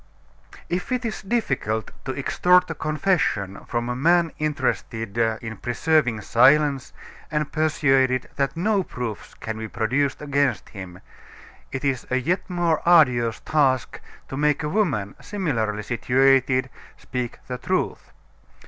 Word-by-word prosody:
X - - -16
If 180 +7 -3
it 250 -1 -1
is 220 - -3
difficult 130 - -1
to 130 0 -4
extort 180 +5 +3
a - - -1
confession 155 - -1
from 120 0 -2
a 125 - -2
man 165 +4 +3
interested 120 -7 -2
in 115 -1 -1
preserving 120 0 +1
silence 135 +4 +3 0.4
and 150 -1 -1
persuaded 135 -5 +2
that 140 +3 -1
no 200 +3 +2
proofs 120 - -6
can 110 0 -6
be 110 - -4
produced 130 +6 0
against 140 -1 0
him, 95 -3 -9 0.7
it 135 +1 -4
is 135 -3 -1
a 130 - +1
yet 175 +10 -1
more 175 -3 +1
arduous 125 -10 +4
task 130 -8 +1 0.3
to - - -6
make 150 +1 +1
a 150 - -1
woman, 145 - 0
similarly 115 - -2
situated, 130 +2 +2 0.3
speak 125 -2 -4
the 125 -1 -5
truth. - - -2
135 Hz, 135 wpm, -23 LUFS, 120-155 Hz, 0.7 s, arduous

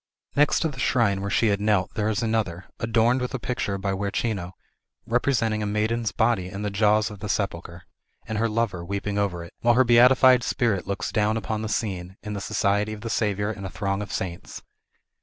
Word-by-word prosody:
Next 145 +1 +3
to - - +2
the 140 -4 -7
shrine 110 -7 +2
where 100 - -3
she 110 +2 +2
had 100 0 0
knelt 105 -3 +1
there 105 0 0
is 110 +1 -1
another, 110 -6 -1
adorned 115 +2 +2
with 125 +2 -3
a - - -3
picture 110 -5 -2
by 95 0 -2
Guercino, 100 -1 -2 0.5
representing 115 -2 +1
a 105 - -1
maiden's 110 +2 0
body 110 -5 +1
in 100 +3 -6
the 105 - -2
jaws 105 +1 +2
of 105 - -10
the 105 - -6
sepulchre, 90 -4 -3 0.4
and 110 -1 -3
her 115 +1 +1
lover 105 -6 -1
weeping 100 +2 -3
over 90 -4 -1
it; 85 - -12
while 120 0 +3
her 130 - +6
beatified 125 +1 +6
spirit 115 -6 0
looks 100 -1 -3
down 105 +1 +1
upon 110 -1 -3
the 110 - -3
scene, 95 -4 -3
in 105 0 -5
the 100 - -4
society 105 0 0
of 105 - -9
the 115 0 -4
Saviour 105 -1 0
and 100 -2 -8
a 95 - -4
throng 100 +1 -2
of 100 - -6
saints. 90 -2 -5
105 Hz, 210 wpm, -25 LUFS, 100-115 Hz, 0.5 s, her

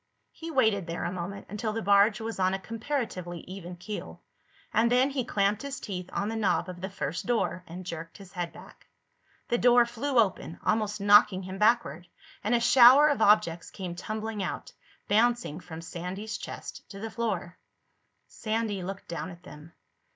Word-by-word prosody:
He 330 - -8
waited 220 - +2
there 165 - -4
a - - -2
moment, 185 +2 -6
until 215 +1 -3
the 225 0 -3
barge 200 +2 +5
was 225 -2 -5
on 185 0 +2
a - - -4
comparatively 220 - -4
even 180 -1 -8
keel, 205 +4 -7 0.5
and 230 +2 +3
then 255 +3 +4
he 270 -2 -1
clamped 200 -1 +1
his 280 0 -5
teeth 185 -3 -6
on 200 - -1
the 225 - -3
knob 210 -3 +1
of 180 -1 -8
the 190 - -3
first 170 -4 -4
door 225 -6 0
and 180 +2 -8
jerked 165 -1 -7
his 195 -3 -13
head 175 -3 -4
back. - - -15 0.6
The 240 - +1
door 245 0 +6
flew 245 +3 -2
open, 190 -6 +1
almost 215 -1 +1
knocking 205 -1 +6
him 190 +1 -7
backward, 210 -7 +2 0.4
and 220 +4 +2
a - - +3
shower 260 +5 +8
of 285 -6 0
objects 205 -6 +3
came 185 -3 -6
tumbling 215 +3 -4
out, 190 - -4 0.3
bouncing 230 -6 +2
from 165 -2 -9
Sandy's 180 +6 -5
chest - - -7
to 195 - -9
the 225 +1 -5
floor. 195 -7 -3 0.7
Sandy 220 -3 -2
looked 195 +2 -6
down 170 +2 -4
at 175 0 -12
them. 155 -1 -12
205 Hz, 180 wpm, -28 LUFS, 180-225 Hz, 0.7 s, shower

